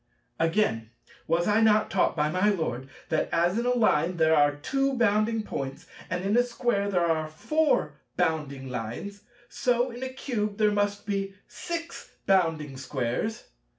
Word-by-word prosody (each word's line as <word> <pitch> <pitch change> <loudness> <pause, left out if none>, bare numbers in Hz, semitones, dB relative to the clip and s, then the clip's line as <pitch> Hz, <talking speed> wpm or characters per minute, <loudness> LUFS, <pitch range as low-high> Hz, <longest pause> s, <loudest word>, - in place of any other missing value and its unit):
Again, 165 - +1 0.4
was 170 +2 +1
I 210 +1 +3
not 215 -1 +4
taught 195 - +2
by 150 -1 +1
my 185 +6 +2
Lord 135 - -2 0.2
that 160 - 0
as 175 +2 +2
in 240 - -1
a 250 - +2
Line 180 -7 +2
there 160 -1 +4
are 145 -1 +4
two 270 - -1
bounding 220 0 +2
Points, 135 -8 -5 0.2
and 180 +1 -2
in 200 +2 +1
a 245 - +6
Square 235 -4 -1
there 180 -3 +2
are 160 -2 0
four 305 - 0 0.2
bounding 140 -4 -1
Lines, 125 - -5 0.3
so 245 +1 0
in 240 +1 -9
a 260 - -3
Cube 220 -6 -3
there 215 -1 +3
must 205 0 -1
be 195 -1 -2
six 335 -1 -6
bounding 160 -7 +1
Squares? 130 - -3
195 Hz, 160 wpm, -27 LUFS, 155-220 Hz, 0.4 s, a